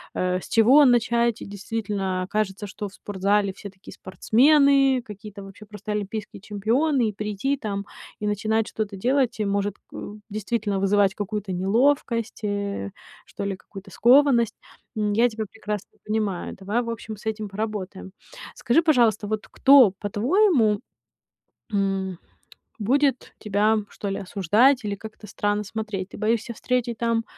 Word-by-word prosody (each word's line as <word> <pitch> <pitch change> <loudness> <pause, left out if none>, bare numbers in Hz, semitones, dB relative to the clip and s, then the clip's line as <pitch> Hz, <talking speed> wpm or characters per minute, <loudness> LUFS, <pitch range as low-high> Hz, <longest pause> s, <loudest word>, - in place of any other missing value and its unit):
э, 185 0 0
с - - -10
чего 255 +6 +6
начать? 235 -1 +2
И - - -7
действительно 200 -2 -3
кажется, 210 -1 -1
что 205 +1 -6
в - - -21
спортзале 200 0 0
все 200 +1 -9
такие 190 0 -14
спортсмены, 270 +5 +3
какие-то 205 -1 -10
вообще 195 +2 -12
просто 210 0 -7
олимпийские 210 -1 -4
чемпионы, 230 +5 +1
и - - -7
прийти 210 +7 -2
там 200 -4 -4 0.3
и 210 - -4
начинать 215 +2 0
что-то 210 -2 -4
делать 250 +2 +1
и 210 - 0
может, 200 0 -1 0.2
э, 205 - -7 0.2
действительно 210 -1 -2
вызывать 195 0 +3
какую-то 205 -1 -4
неловкость, 230 +4 +1
э, 200 - -2 0.4
что - - -7
ли, 200 -1 -2
какую-то 195 +1 -12
скованность. 240 -1 +4 0.4
М, 210 -1 0
я 240 +3 +4
тебя 220 -1 -4
прекрасно 210 -2 -6
понимаю. 210 -4 -2
Давай, 205 +5 -1
в 230 - -5
общем, 220 -2 -6
с - - -16
этим 215 -2 -3
поработаем. 195 -2 -5 0.4
Скажи, 295 +8 +2
пожалуйста, 235 -9 +3
вот 215 0 -3
кто, 270 -7 +6
по-твоему, 230 - +2 0.9
м, 195 -3 -1 0.6
будет 265 +4 +1
тебя, 215 +1 +2
что 200 - -6
ли, 195 - -2
осуждать 210 - +2
или 205 -1 -2
как-то 215 0 -11
странно 205 +1 -1
смотреть? 205 -2 -5
Ты - - -10
боишься 225 +2 0
встретить 240 -1 -1
там, 230 -1 0
210 Hz, 145 wpm, -24 LUFS, 200-235 Hz, 0.9 s, чего